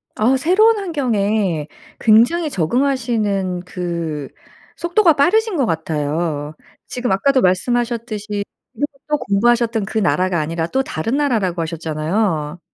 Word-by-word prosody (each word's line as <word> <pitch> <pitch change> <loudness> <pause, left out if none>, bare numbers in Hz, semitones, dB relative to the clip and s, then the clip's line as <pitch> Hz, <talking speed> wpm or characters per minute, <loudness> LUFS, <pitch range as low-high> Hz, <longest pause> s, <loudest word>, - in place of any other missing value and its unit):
어 240 +5 +3
새로운 425 - +4
환경에 215 - 0 0.3
굉장히 245 +10 +4
적응하시는 215 - 0
그 170 -5 -4 0.5
속도가 345 0 +3
빠르신 385 +8 +2
것 270 - +2
같아요. 155 -1 -2 0.3
지금 245 -3 -3
아까도 260 +7 +3
말씀하셨듯이 215 +1 -1 0.3
그렇게 280 +4 -4
또 300 0 +1
공부하셨던 230 0 +1
그 220 - -2
나라가 185 -2 +1
아니라 165 +2 -2
또 265 +8 0
다른 225 - -2
나라라고 215 -12 0
하셨잖아요. 160 +1 -2
215 Hz, 305 characters per minute, -19 LUFS, 170-265 Hz, 0.5 s, 새로운